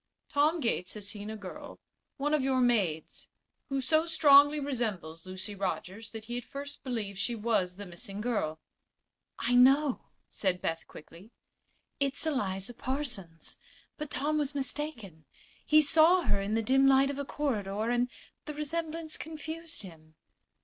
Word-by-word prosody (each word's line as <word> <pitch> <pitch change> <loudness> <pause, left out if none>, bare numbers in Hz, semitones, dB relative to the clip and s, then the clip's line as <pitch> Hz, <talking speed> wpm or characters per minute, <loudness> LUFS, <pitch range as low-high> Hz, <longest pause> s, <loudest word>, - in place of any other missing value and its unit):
Tom 305 +4 +3
Gates 200 -7 -1
has 205 -2 -4
seen 205 0 -4
a 220 - -5
girl 190 -3 -9 0.4
one 295 +2 0
of 305 - +3
your 260 0 +1
maids 205 -11 0 0.4
who 275 -1 0
so 315 +5 +2
strongly 290 -2 +6
resembles 210 - -3
Lucy 185 +3 -6
Rogers 195 +2 -4
that 220 0 -8
he 240 +1 -3
at - - -10
first 285 +3 -8
believed 215 -7 -4
she 240 - -1
was 210 -5 0
the 205 - -7
missing 195 +3 -8
girl." 210 -9 -1 0.8
"I 240 - 0
know," 270 +2 +5 0.3
said 185 -3 -1
Beth, 165 -2 -3
quickly. 170 +7 -13 0.7
"It's 280 +2 +1
Eliza 205 -8 -1
Parsons. 235 - -4 0.4
But 300 -1 -4
Tom 300 +4 0
was 290 -1 -2
mistaken. 260 - -3 0.4
He 310 0 +7
saw 325 +5 +6
her 200 - +1
in 205 +2 -1
the 225 - +1
dim 270 +4 +4
light 270 +1 +5
of 280 - -6
a - - -1
corridor, 220 -7 -1
and 245 +1 +1 0.4
the 300 - -6
resemblance 315 +1 -3
confused 320 -1 -6
him." 160 -4 -13
245 Hz, 155 wpm, -30 LUFS, 195-290 Hz, 0.8 s, He